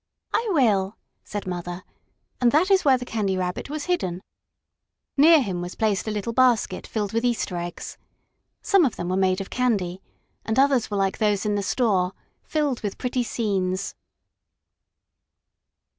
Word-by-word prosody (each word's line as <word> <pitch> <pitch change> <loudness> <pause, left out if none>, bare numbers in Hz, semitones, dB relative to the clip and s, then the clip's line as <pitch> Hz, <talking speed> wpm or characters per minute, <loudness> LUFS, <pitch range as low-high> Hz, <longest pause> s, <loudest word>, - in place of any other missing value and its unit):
"I 460 -1 +1
will," 215 - +2 0.3
said 205 -1 -5
Mother, 175 0 -5 0.6
and 240 -1 +5
that 345 - +3
is 385 -1 +5
where 270 -3 +5
the 245 - -7
Candy 205 -5 -1
Rabbit 180 +6 -3
was 300 0 -4
hidden. 185 - -1 0.9
Near 310 +1 +6
him 185 -5 -3
was 175 +1 -6
placed 215 -2 0
a - - 0
little 210 +2 -3
basket 250 -2 +2
filled 210 -2 -3
with 230 +1 0
Easter 235 -6 0
eggs. 175 0 -6 0.6
Some 395 -3 +4
of 265 - +1
them 175 - -4
were 185 - 0
made 190 0 +2
of 195 - -8
candy, 195 -8 0 0.4
and 220 - -2
others 270 -3 +3
were 205 - -2
like 195 -1 0
those 210 -1 +1
in 210 - +1
the 205 - 0
store 195 -4 +1 0.3
filled 295 -5 -1
with 205 -2 -4
pretty 250 0 -1
scenes. 195 -5 -1
210 Hz, 160 wpm, -24 LUFS, 190-255 Hz, 0.9 s, Near